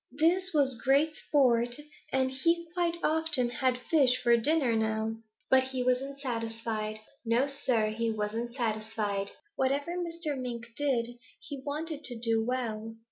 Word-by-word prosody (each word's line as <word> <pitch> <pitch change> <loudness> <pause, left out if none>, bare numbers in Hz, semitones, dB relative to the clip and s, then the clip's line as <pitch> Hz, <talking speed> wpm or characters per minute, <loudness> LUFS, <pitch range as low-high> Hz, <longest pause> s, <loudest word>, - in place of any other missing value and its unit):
This 360 +4 +3
was 270 -5 +1
great 285 +4 +4
sport, 240 -6 +2 0.4
and 260 0 +1
he 335 +6 +1
quite 345 -1 0
often 305 -6 +1
had 255 0 +1
fish 255 -1 +3
for 240 -1 +6
dinner 260 0 +2
now. 220 0 0 0.3
"But 260 0 +5
he 260 -1 -2
wasn't 260 +2 0
satisfied. 225 -4 -3 0.2
No, 235 +3 +2
Sir, 240 -6 +1
he 230 +1 -1
wasn't 220 +2 -2
satisfied. 215 -4 -2 0.3
Whatever 280 +6 0
Mr. 335 -4 -3
Mink 245 -3 -5
did, 240 -4 -1 0.2
he 280 -2 -8
wanted 305 +1 -4
to 245 - 0
do 225 -1 +1
well. 225 -3 -3
250 Hz, 140 wpm, -30 LUFS, 225-285 Hz, 0.4 s, for